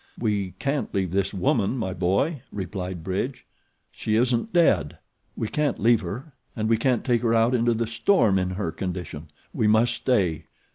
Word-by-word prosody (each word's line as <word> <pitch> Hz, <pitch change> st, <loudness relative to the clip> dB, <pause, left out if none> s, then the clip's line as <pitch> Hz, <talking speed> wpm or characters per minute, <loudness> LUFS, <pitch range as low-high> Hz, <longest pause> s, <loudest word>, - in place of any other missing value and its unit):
"We 100 Hz, -5 st, -1 dB
can't 140 Hz, +5 st, -2 dB
leave 95 Hz, -3 st, 0 dB
this 100 Hz, +1 st, 0 dB
woman, 100 Hz, +4 st, +1 dB
my 95 Hz, -6 st, -2 dB
boy," 100 Hz, -, 0 dB
replied 95 Hz, -3 st, -5 dB
Bridge. 100 Hz, +9 st, -3 dB, 0.5 s
"She 110 Hz, -, -2 dB
isn't 125 Hz, -, +1 dB
dead. 100 Hz, -, +2 dB, 0.4 s
We 110 Hz, -, -2 dB
can't 150 Hz, +1 st, 0 dB
leave 115 Hz, +2 st, +3 dB
her, 120 Hz, -, -7 dB, 0.2 s
and 110 Hz, -1 st, -1 dB
we 115 Hz, 0 st, +3 dB
can't 125 Hz, +1 st, +1 dB
take 120 Hz, -3 st, +2 dB
her 115 Hz, -1 st, +2 dB
out 115 Hz, +2 st, +3 dB
into 120 Hz, -1 st, +2 dB
the 115 Hz, +1 st, 0 dB
storm 115 Hz, -, +2 dB
in 90 Hz, 0 st, -1 dB
her 100 Hz, -6 st, -2 dB
condition. 85 Hz, -3 st, -6 dB, 0.2 s
We 110 Hz, -, +1 dB
must 110 Hz, +3 st, +4 dB
stay. 95 Hz, -, 0 dB
110 Hz, 175 wpm, -25 LUFS, 95-120 Hz, 0.5 s, must